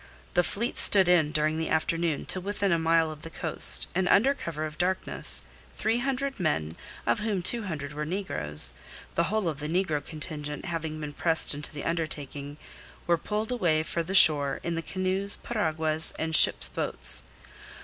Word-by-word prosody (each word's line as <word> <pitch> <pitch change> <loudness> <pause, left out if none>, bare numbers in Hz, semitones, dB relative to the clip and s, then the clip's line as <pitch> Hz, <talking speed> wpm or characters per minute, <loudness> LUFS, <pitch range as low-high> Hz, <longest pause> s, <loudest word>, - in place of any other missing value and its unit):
The 175 - +3
fleet 220 +7 -3
stood 190 -3 +6
in 165 -4 +2
during 155 +1 -1
the 160 - -3
afternoon 160 -1 -1
to 185 - -2
within 200 0 -2
a 170 - +1
mile 165 0 +1
of 155 -1 -11
the 165 - -9
coast, 160 -1 +5
and 185 0 -1
under 265 +8 +3
cover 155 - -6
of 155 0 -9
darkness 185 +1 +4 0.3
three 225 +2 -1
hundred 270 0 -3
men, 80 - -2 0.3
of 120 - 0
whom 210 -4 -3
two 230 +4 -1
hundred 150 -5 -6
were 150 +1 -5
negroes 75 - +2 0.4
the 170 - 0
whole 215 -1 -2
of 155 -3 -4
the 150 +1 -5
negro 160 -4 -1
contingent 150 -1 -6
having 160 -3 -5
been 150 -1 -7
pressed 165 0 +1
into 145 +1 -4
the 145 - -8
undertaking 145 -3 -5 0.5
were 170 - +2
pulled 210 +7 -4
away 170 -10 0
for 170 +1 -3
the 185 +4 -5
shore 145 -6 +6
in 170 - -3
the 165 - -3
canoes, 190 +3 -1
piraguas, 160 -7 0
and 160 0 -2
ships' - - +4
boats. - - -3
165 Hz, 180 wpm, -26 LUFS, 150-190 Hz, 0.5 s, stood